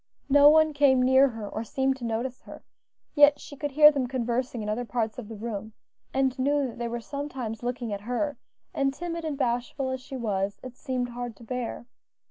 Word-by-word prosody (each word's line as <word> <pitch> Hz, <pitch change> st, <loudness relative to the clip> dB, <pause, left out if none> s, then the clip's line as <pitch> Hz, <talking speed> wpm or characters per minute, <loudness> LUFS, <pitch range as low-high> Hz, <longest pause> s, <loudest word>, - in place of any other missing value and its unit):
No 285 Hz, +1 st, +8 dB
one 315 Hz, 0 st, +5 dB
came 280 Hz, -3 st, +4 dB
near 260 Hz, +2 st, +6 dB
her 225 Hz, -5 st, -6 dB
or 220 Hz, -, -4 dB
seemed 265 Hz, +4 st, 0 dB
to 255 Hz, -, -11 dB
notice 235 Hz, +3 st, -3 dB
her, -, -, -12 dB, 0.5 s
yet 290 Hz, -1 st, +6 dB
she 285 Hz, -, -10 dB
could 290 Hz, +1 st, -3 dB
hear 300 Hz, +2 st, +8 dB
them 275 Hz, -4 st, -1 dB
conversing 245 Hz, -1 st, -2 dB
in -, -, -5 dB
other 215 Hz, +4 st, -1 dB
parts 230 Hz, -1 st, -2 dB
of 225 Hz, -, -8 dB
the 225 Hz, -, -7 dB
room, 215 Hz, 0 st, -5 dB, 0.4 s
and 265 Hz, -1 st, 0 dB
knew 285 Hz, +2 st, +2 dB
that 240 Hz, -2 st, -7 dB
they 235 Hz, -, -2 dB
were 235 Hz, +1 st, -3 dB
sometimes 260 Hz, -4 st, -5 dB
looking 240 Hz, -2 st, -3 dB
at 200 Hz, -, -5 dB
her, 250 Hz, +6 st, -2 dB, 0.4 s
and, 275 Hz, 0 st, 0 dB
timid 335 Hz, 0 st, -4 dB
and 305 Hz, -3 st, -3 dB
bashful 250 Hz, +1 st, -1 dB
as 260 Hz, 0 st, -4 dB
she 265 Hz, +1 st, -7 dB
was, 200 Hz, -4 st, -2 dB
it 255 Hz, -1 st, -8 dB
seemed 255 Hz, -3 st, -3 dB
hard 240 Hz, -1 st, -6 dB
to -, -, -15 dB
bear. 240 Hz, 0 st, -4 dB
255 Hz, 210 wpm, -27 LUFS, 235-275 Hz, 0.5 s, No